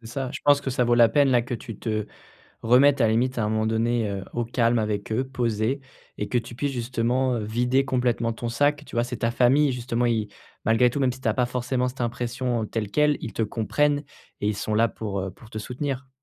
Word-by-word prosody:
C'est 115 - -12
ça. 130 +2 -4
Je - - -6
pense 145 -1 +4
que 135 - -2
ça 125 -1 +1
vaut 120 0 +3
la 120 -1 +6
peine, 145 -2 +4
là, 120 -2 +3
que 125 - -7
tu 115 -2 -6
te 110 -2 -2 0.5
remettes 135 +4 +5
à 115 - +5
la 110 - +2
limite 125 +3 +1
à 110 - +1
un - - 0
moment 110 0 0
donné, 115 0 +1
heu, 100 -1 -4
au 120 -1 0
calme 115 0 +1
avec 105 -1 -2
eux, 125 +4 0
posés, 120 0 -1 0.4
et 105 - -3
que 125 - -1
tu 120 0 -3
puisses 140 +2 -1
justement, 125 +1 0
heu, 110 - -3
vider 125 +5 +1
complètement 120 -2 0
ton 120 +1 -4
sac, 145 +5 +1
tu - - -12
vois? 120 0 +2
C'est 125 0 -5
ta 115 -1 0
famille, 130 +4 +3
justement, 120 0 -2
ils 110 -3 +1 0.4
malgré 115 +2 +4
tout, 140 - -3
même 130 -2 +2
si 130 - -11
t'as 110 - +2
pas 125 +1 +1
forcément 125 +1 -1
cette 125 0 -6
impression, 120 0 -2
heu, - - -2
telle 105 -2 -3
quelle, 150 +2 +3
ils 115 - -5
te - - -4
comprennent 145 +7 0 0.4
et 105 - +2
ils 105 - -1
sont 105 +1 -2
là 115 +2 +4
pour, 105 -3 -5
heu, 95 0 -3
pour 110 +4 -16
te 110 - -11
soutenir. 130 +3 -4
120 Hz, 250 wpm, -25 LUFS, 110-130 Hz, 0.5 s, la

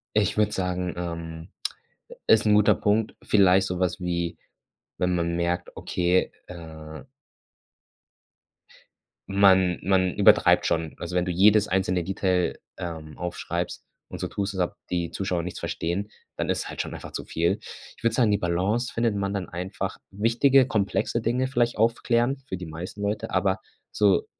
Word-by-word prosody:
Ich 105 0 +2
würde 105 -1 +2
sagen, 90 -1 -2
ähm, 85 -1 -5 0.8
ist 110 -1 +5
'n 105 - +5
guter 105 0 +5
Punkt. 105 +1 +1
Vielleicht 95 -2 +4
so 90 -1 -3
was 90 0 0
wie, 85 -1 -2 0.6
wenn 90 -1 +1
man 85 0 0
merkt, 85 0 -2
okay, 90 +1 +1 0.2
äh 80 -4 -9 2.3
Man 95 -2 +4
man 95 -1 +2
übertreibt - - +5
schon. 80 -1 -1
Also, 85 +1 -5
wenn 90 -1 +2
du 90 - -3
jedes 105 +4 +5
einzelne 90 -1 +1
Detail, 95 -1 0 0.2
ähm, 80 -4 -7
aufschreibst 90 0 -4 0.2
und - - -7
so - - -1
tust 100 0 -3
als 95 - +1
ob - - -31
die 85 -2 -1
Zuschauer 90 -3 -2
nichts 90 - -6
verstehen, 95 +5 -3 0.3
dann - - -2
ist - - -1
halt - - -3
schon - - -7
einfach - - -8
zu - - -5
viel. 85 +1 0 0.4
Ich - - -20
würde 115 -1 +2
sagen, 115 -3 +3
die 100 - +2
Balance 95 +8 0
findet 115 -2 +1
man 100 -1 -1
dann 95 -4 -3
einfach 95 +2 -4
wichtige, 120 +6 +4
komplexe 110 +1 0
Dinge 125 +3 +1
vielleicht 120 -3 +1
aufklären 120 +3 +1
für 95 - -3
die 90 -1 -7
meisten 85 +6 -7
Leute, 105 +1 -2
aber 95 0 +1 0.3
so 100 -3 +3
95 Hz, 160 wpm, -25 LUFS, 85-105 Hz, 2.3 s, ist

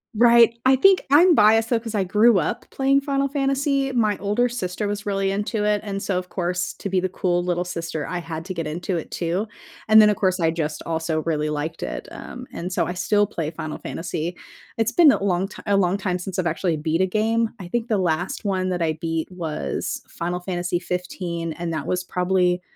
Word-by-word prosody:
Right, 235 0 +6
I 260 +1 +6
think 380 +8 +5
I'm 335 +4 +7
biased 220 0 +5
though 235 - +2
'cause 225 -1 -7
I 205 -3 +1
grew 210 +3 +4
up - - -2
playing 275 +1 +2
Final 275 -1 0
Fantasy, 275 0 0
my 215 -5 +1
older 210 +5 +1
sister 210 -3 -3
was 205 0 -4
really 195 -1 0
into 205 +2 -1
it, 210 -1 +2
and 195 -2 -4
so 195 -2 -1
of 180 0 -4
course, 180 -1 -2
to 200 - -4
be 190 -1 +2
the 185 - 0
cool 175 -1 0
little 175 0 0
sister, 165 -4 -4
I 180 - -3
had 165 -2 -5
to 190 - -4
get 165 -2 -3
into 175 +4 -3
it 160 - -6
too. 175 +4 -1 0.4
And 220 0 +8
then 210 - +6
of 210 - +2
course, 190 -3 +1
I 165 -2 +3
just 155 -2 -3
also 160 -1 -1
really 155 -2 -1
liked 155 +2 -4
it, - - -5
um, 250 +1 -9
and 180 +2 -5
so - - +1
I 180 - -3
still 205 +4 +2
play 160 -6 -4
Final 155 -2 -6
Fantasy. 170 0 -4 0.4
It's 225 +1 +2
been 315 +1 +7
a 195 - -1
long 190 -1 +1
ti 210 - -11
a 200 -1 +3
long 185 -1 +2
time 185 -3 -1
since 185 +1 -5
I've 175 - +1
actually 165 0 0
beat 160 +3 0
a - - +4
game, 220 +4 +1
I 180 - -7
think 235 +5 -2
the 215 -4 +1
last 175 0 -1
one 190 -2 0
that 180 -1 -2
I 160 -1 0
beat 165 +1 -3
was 165 -4 -3
Final 175 +1 -3
Fantasy 175 -1 -2
XV, 180 -2 -4
and 170 +1 -4
that 155 -3 -3
was 180 0 -1
probably 180 0 +1
185 Hz, 225 wpm, -23 LUFS, 170-215 Hz, 0.4 s, And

